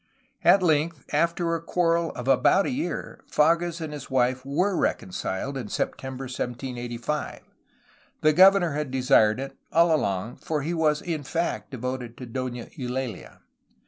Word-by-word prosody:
At 195 - +6
length, 155 -2 +1
after 170 +2 +1
a 165 - -1
quarrel 170 -1 +1
of 125 -1 -6
about 135 +9 +4
a - - -1
year, 280 +5 -4
Fages 170 +2 +2
and 160 -2 -5
his 145 -2 -8
wife 130 0 +1
were 180 +9 0
reconciled, 95 - -2
in 125 -5 -5
September 130 +5 -3
1785. 125 +1 -4 0.8
The 155 0 +4
governor 190 0 +6
had 150 -1 -2
desired 125 -3 +3
it, 135 0 -6 0.2
all 170 0 +4
along, 100 -3 -2
for 150 -3 -3
he 165 +4 -2
was 155 -2 +1
in 165 -4 -2
fact 135 -7 -2
devoted 125 -1 -5
to 125 - -7
Dona 125 -1 -4
Eulaha. 125 -2 -5
140 Hz, 145 wpm, -26 LUFS, 125-165 Hz, 0.8 s, At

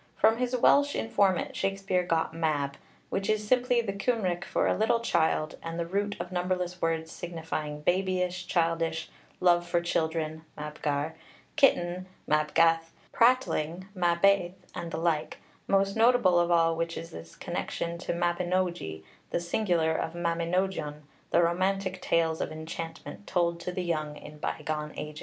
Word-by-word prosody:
From 220 +1 +4
his 250 +1 0
Welsh 285 +4 +4
informant 200 -5 +1
Shakspeare 195 -1 0
got 165 -2 0
Mab, 150 -4 0 0.4
which 195 0 -1
is 215 -1 +1
simply 245 0 +3
the 205 -4 -3
Cymric 200 -4 0
for - - 0
a - - +2
little 220 +2 +2
child, 160 -7 +1
and 165 0 -5
the 170 - -1
root 205 +4 -1
of - - -5
numberless 180 0 -2
words 165 0 -1
signifying 160 -3 -5
babyish, 180 +1 0
childish, 165 -2 0 0.3
love 175 -1 +4
for 175 0 +2
children 160 -2 -1
(mabgar), 150 0 -2 0.4
kitten 180 -8 +3 0.2
(mabgath), 165 +2 +3 0.2
prattling 190 -8 +2
(mabiaith), 180 +1 +3 0.2
and 170 - -5
the 165 - -4
like, 160 -2 0 0.3
most 195 0 +2
notable 225 -6 +5
of 175 0 +2
all 165 -1 +4
which 165 0 -2
in 165 - -5
this 80 0 -10
connection 170 0 -3
is - - -9
mabinogi, 175 - -1 0.3
the - - 0
singular 170 -2 +1
of 160 - -2
Mabinogion, 170 -2 -1 0.3
the 170 - +4
romantic 185 +2 0
tales 165 -1 +1
of - - -2
enchantment 165 +4 -7
told 170 -1 +1
to 175 +1 -4
the 180 0 -3
young 155 -3 -2
in 150 0 -11
by 155 - -3
gone 150 0 -3
ages. 150 0 -6
175 Hz, 150 wpm, -29 LUFS, 160-190 Hz, 0.4 s, notable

